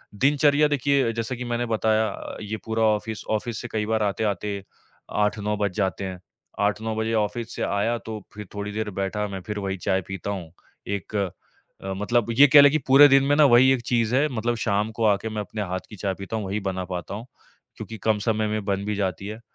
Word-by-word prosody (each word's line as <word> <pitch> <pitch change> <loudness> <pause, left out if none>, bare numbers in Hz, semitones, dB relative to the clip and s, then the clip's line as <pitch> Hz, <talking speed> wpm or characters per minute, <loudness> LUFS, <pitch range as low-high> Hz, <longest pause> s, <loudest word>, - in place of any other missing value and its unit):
दिनचर्या 145 +4 +4
देखिए, 140 -3 +1
जैसा 115 +2 -3
कि 125 - -6
मैंने 120 0 -1
बताया 110 -1 +1
अ, - - -7
ये 110 +1 -4
पूरा 110 0 0
ऑफ़िस 110 0 0
ऑफ़िस 110 +1 -2
से 120 - -6
कई 105 -1 -1
बार 110 0 0
आते-आते 100 -1 -2 0.5
8-9 105 0 0
बज 100 -2 0
जाते 100 -2 -1
हैं। 95 -1 -6 0.4
8-9 105 +2 0
बजे 110 +1 -1
ऑफ़िस 115 +3 -5
से - - -5
आया 110 +4 0
तो 110 -1 -5
फिर 105 -1 -8
थोड़ी 105 0 -4
देर 110 0 -3
बैठा 105 +2 -2
मैं 95 -2 -6
फिर 105 -1 -3
वही 95 -1 -3
चाय 95 +1 0
पीता 95 +1 -4
हूँ। 90 -5 -6 0.4
एक 100 +1 -4
अ, 100 -3 +1 0.6
मतलब 105 +4 +1
ये 145 - +11
कह 145 +1 +9
लें 140 - +7
कि 155 - +2
पूरे 140 +2 +9
दिन 135 -1 +5
में 145 +1 +3
ना 150 - +6
वही 130 0 +6
एक 125 - -1
चीज़ 115 -2 +1
है 145 +3 +3
मतलब 120 -1 -1
शाम 105 0 +1
को 115 - 0
आके 105 +2 +2
मैं 110 -1 -3
अपने 105 +1 -5
हाथ 95 -1 -2
की 105 - -9
चाय 100 0 -2
पीता 100 +3 -5
हूँ, 105 - -3
वही 100 +2 -2
बना 95 -2 -3
पाता 90 +1 -5
हूँ, 110 +3 -7 0.5
क्योंकि 115 - -7
कम 110 -1 +3
समय 110 -2 +1
में 105 0 -2
बन 100 0 -1
भी 105 - -1
जाती 95 -1 -2
है। 110 +1 -6
110 Hz, 225 wpm, -24 LUFS, 100-115 Hz, 0.6 s, ये